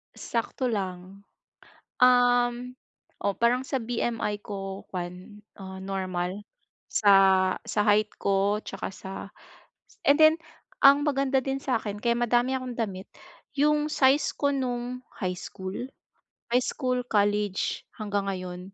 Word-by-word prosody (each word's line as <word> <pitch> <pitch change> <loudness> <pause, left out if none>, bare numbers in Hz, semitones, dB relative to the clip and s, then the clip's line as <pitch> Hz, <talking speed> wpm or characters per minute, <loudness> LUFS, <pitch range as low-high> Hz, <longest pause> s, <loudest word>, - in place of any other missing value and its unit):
Sakto 240 +2 -2
lang. 190 -1 -5 0.7
Uhm, 245 0 +3 0.5
oh, 200 - +2
parang 245 +2 +2
sa 265 -1 -2
BMI 225 -2 -2
ko 195 -1 -6
kuwan, 180 +3 -7 0.2
ah, 190 -1 -8
normal, 190 0 -3 0.4
sa 195 -2 +5 0.2
sa - - +1
height 210 +1 +3
ko 200 +2 +1
tsaka - - -5
sa 190 0 -9 1.0
and 285 +1 +6
then, 315 0 +7 0.5
ang 280 +1 +8
maganda 275 -2 +2
din 270 +1 -2
sa'kin, 220 -5 -2
kaya 235 -1 +2
madami 240 +2 +2
akong 255 -1 -6
damit, 195 -4 -3 0.5
yung 300 +1 +3
size 275 0 +3
ko 285 - +1
nung 250 -1 -3 0.2
high 185 -3 -1
school, 190 +1 -7 0.8
high 250 +2 +3
school, 255 -3 -1
college, 205 -1 +1
hanggang 205 -2 -2
ngayon, 180 -1 -5
215 Hz, 120 wpm, -27 LUFS, 195-250 Hz, 1.0 s, ang